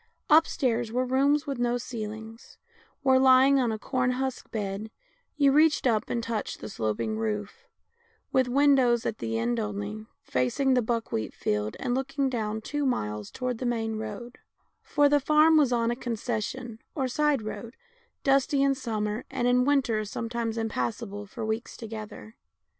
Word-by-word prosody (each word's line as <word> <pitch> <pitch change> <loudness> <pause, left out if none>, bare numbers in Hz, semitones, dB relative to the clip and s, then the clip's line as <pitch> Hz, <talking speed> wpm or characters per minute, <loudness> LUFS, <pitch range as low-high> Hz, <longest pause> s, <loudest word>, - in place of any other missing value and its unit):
Upstairs 245 -7 +3
were 250 +2 0
rooms 280 +4 +2
with 275 -4 -4
no 240 0 +1
ceil 235 -3 -4
ings, 220 +1 -11 0.5
where, 260 -1 +5
lying 265 +1 +6
on 245 -3 +1
a 220 - -2
corn 250 +2 0
husk 260 0 -3
bed, 205 0 -4 0.5
you 280 -2 +5
reached 305 +1 +4
up 225 -4 +1
and 235 -1 -1
touched 230 -2 -3
the - - -7
sloping 155 - -2
roof, 215 - -4 0.6
with 260 -1 +3
windows 260 -3 +4
at 220 - -2
the 115 0 -2
end 115 +1 0
only, 105 +1 -4 0.2
facing 130 - +1
the 250 - +3
buckwheat 225 - -2
field, 105 0 -2
and 245 -2 -1
looking 270 +1 -1
down 220 -2 -2
two 290 +6 -3
miles 105 - -2
toward 250 -2 -3
the 255 - -3
main 225 -2 -1
road 220 +3 -7 0.2
— - - -46
for 290 -1 +3
the 290 0 +4
farm 305 +3 +5
was 290 -5 +4
on 235 -1 +2
a - - -1
concession 235 0 -4 0.2
or 265 -3 0
side 290 -1 +1
road, 215 +3 -7 0.5
dusty 275 0 +3
in 275 0 +4
summer, 215 -3 -3
and 250 -2 -1
in 250 0 +4
win 285 -1 +3
ter 220 -3 -1
sometimes 230 +2 -3
impassable 205 - -3
for 225 +2 -6
weeks 220 +2 -3
together. 220 0 -8
235 Hz, 170 wpm, -27 LUFS, 215-265 Hz, 0.6 s, lying